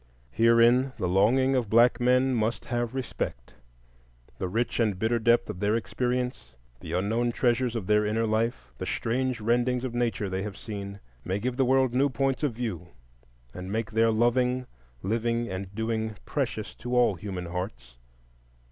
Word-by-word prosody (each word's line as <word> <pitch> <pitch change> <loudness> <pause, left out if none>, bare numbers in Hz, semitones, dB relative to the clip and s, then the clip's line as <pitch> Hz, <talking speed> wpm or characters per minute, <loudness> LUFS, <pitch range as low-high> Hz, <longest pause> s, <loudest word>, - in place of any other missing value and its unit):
Herein 115 - +4
the 90 - -1
longing 120 +9 +3
of 120 -5 0
black 120 +2 +5
men 125 +2 +3
must 115 0 -1
have 120 0 -2
respect: 90 - -4 0.9
the 95 - -1
rich 115 +8 -1
and 105 -5 +1
bitter 110 +4 +1
depth 120 +1 +3
of 90 - -6
their 105 +2 +1
experience, 125 - -2 0.2
the - - -7
unknown 110 +6 +1
treasures 120 0 +1
of 110 -5 -3
their 105 +1 +3
inner 110 +2 0
life, 110 - -1
the - - -4
strange 125 +1 -1
rendings 120 +3 +1
of 130 -2 -3
nature 115 -4 -1
they 95 0 -2
have 105 -1 -5
seen, 100 -2 -7 0.2
may 95 +1 -1
give 125 +4 -2
the 135 0 +2
world 130 -1 +3
new 135 +3 +3
points 135 +1 0
of 145 -5 0
view 110 -8 -4 0.7
and 90 +1 -7
make 110 -1 -2
their 115 +1 +3
loving, 125 +3 +2 0.4
living, 115 +3 0
and 95 +1 -6
doing 110 -1 -2
precious 125 -7 -3
to 125 +2 -3
all 120 -4 +4
human 95 0 -6
hearts. 90 - -6
115 Hz, 165 wpm, -27 LUFS, 105-125 Hz, 0.9 s, black